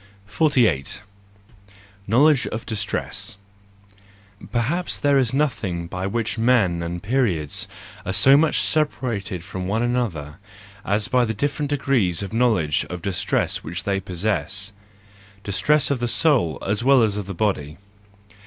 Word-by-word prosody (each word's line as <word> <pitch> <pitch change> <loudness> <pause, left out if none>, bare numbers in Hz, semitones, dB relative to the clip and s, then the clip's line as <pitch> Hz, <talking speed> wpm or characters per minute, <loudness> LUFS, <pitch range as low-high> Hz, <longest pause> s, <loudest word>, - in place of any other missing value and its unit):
48. 115 - +1 1.0
Knowledge 135 +6 +4
of 110 - -5
Distress 105 -2 -3 1.0
.—Perhaps 145 +10 -2
there 145 -1 +3
is 125 -4 +1
nothing 115 - -1
by 90 +2 -4
which 115 +2 -2
men 110 -8 +3
and 85 +1 -5
periods 100 - 0 0.4
are 95 - -3
so 135 +7 +6
much 155 +2 +3
separated 120 - -1
from 90 0 -5
one 110 +4 0
another, 100 -13 -2 0.5
as 105 +1 0
by 125 -1 +3
the 110 -2 -2
different 145 +4 -2
degrees 130 - +1
of 100 - -7
knowledge 110 - +2
of 90 -1 -6
distress 95 -3 0
which 85 +2 -4
they 100 0 0
possess; 95 +1 -2 0.7
distress 145 +9 +2
of 135 - 0
the 120 - -1
soul 120 - +2
as 105 +3 0
well 135 -2 +5
as 105 -2 +1
of 105 -2 -4
the 100 - -5
body. 80 -7 -1
110 Hz, 135 wpm, -22 LUFS, 90-130 Hz, 1.0 s, so